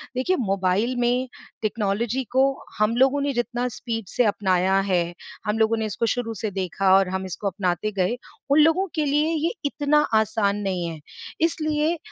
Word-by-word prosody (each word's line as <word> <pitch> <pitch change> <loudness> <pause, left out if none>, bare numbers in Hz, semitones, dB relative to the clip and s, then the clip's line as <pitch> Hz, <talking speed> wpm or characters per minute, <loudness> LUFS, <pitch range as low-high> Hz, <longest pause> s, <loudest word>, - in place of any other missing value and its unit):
देखिए, 260 +9 +1
मोबाइल 195 +2 0
में 245 +2 +1 0.3
टेक्नोलॉजी 220 +4 -1
को 260 +1 +4 0.4
हम 215 +2 +2
लोगों 270 +2 +3
ने 280 0 0
जितना 240 +1 -1
स्पीड 225 -4 -4
से 245 - +4
अपनाया 190 -1 +2
है, 175 -1 +1 0.3
हम 210 +1 0
लोगों 225 +1 +3
ने 220 - -1
इसको 215 +2 -1
शुरू 235 -2 -3
से 215 - -1
देखा 190 0 +1
और 195 -1 +2
हम 190 0 -3
इसको 190 +2 -4
अपनाते 190 +1 -1
गए, 195 +4 0 0.3
उन 290 - +6
लोगों 325 +5 +4
के 310 -2 +1
लिए 300 +3 +2
ये 335 - +1
इतना 290 +1 +2 0.2
आसान 205 -1 0
नहीं 180 -2 -1
है। 160 -2 -7 0.4
इसलिए 310 0 +1
225 Hz, 175 wpm, -24 LUFS, 195-265 Hz, 0.4 s, उन